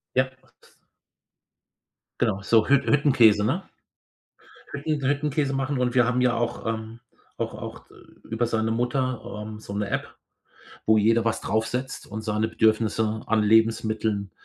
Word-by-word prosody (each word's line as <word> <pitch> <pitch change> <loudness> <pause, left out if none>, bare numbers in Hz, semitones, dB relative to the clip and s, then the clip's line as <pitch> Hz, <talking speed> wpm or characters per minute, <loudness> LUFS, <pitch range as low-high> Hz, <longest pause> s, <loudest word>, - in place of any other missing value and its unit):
Ja. 130 0 +2 1.9
Genau, 95 - +1
so 110 +2 +3
Hütt 140 -1 +4
Hüttenkäse, 120 -8 +4
ne? - - 0 1.1
Hütten 140 -1 -2
Hüttenkäse 145 -1 0
machen. 135 0 -1
Und 125 -1 0
wir 125 -2 +5
haben 125 0 +1
ja 125 -2 +3
auch, 120 -1 -3
ähm 110 +1 -4 0.4
auch - - -2
auch - - -8 0.4
über 115 +2 -1
seine 110 -1 0
Mutter, 125 +2 -1 0.3
ähm, 110 0 -8
so 100 - -8
'ne 105 -1 -2
App, - - -4 0.7
wo 110 0 +5
jeder 115 +2 +3
was 115 - 0
draufsetzt 125 +5 -2
und 110 +1 -6
seine 110 +1 -1
Bedürfnisse 110 0 +1
an 110 -1 +2
Lebensmitteln 110 -2 +1
115 Hz, 135 wpm, -25 LUFS, 110-130 Hz, 1.9 s, wir